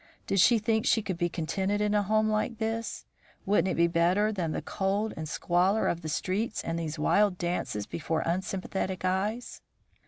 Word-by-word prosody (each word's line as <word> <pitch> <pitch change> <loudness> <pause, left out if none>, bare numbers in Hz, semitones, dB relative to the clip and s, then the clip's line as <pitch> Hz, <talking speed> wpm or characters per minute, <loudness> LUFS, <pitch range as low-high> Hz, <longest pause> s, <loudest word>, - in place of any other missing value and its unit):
Did 195 - 0
she 235 +6 +6
think 220 0 0
she 220 - +3
could 185 -4 -4
be 175 -1 +1
contented 190 +5 -1
in 210 0 +1
a 210 - +3
home 215 +2 +2
like 215 +2 -1
this? 225 +1 -3 0.4
Wouldn't 200 -1 +2
it 185 - 0
be 170 - +4
better 175 +5 +2
than 175 -6 -2
the - - -3
cold 200 +3 -1
and 155 -1 -5
squalor 180 +6 +1
of 170 - -1
the 155 - -5
streets 200 +8 -1
and 165 0 -2
these 160 -1 -4
wild 200 +5 +3
dances 175 - -2
before 160 0 -2
unsympathetic 185 +1 -2
eyes? 205 +6 -2
190 Hz, 185 wpm, -28 LUFS, 170-215 Hz, 0.4 s, she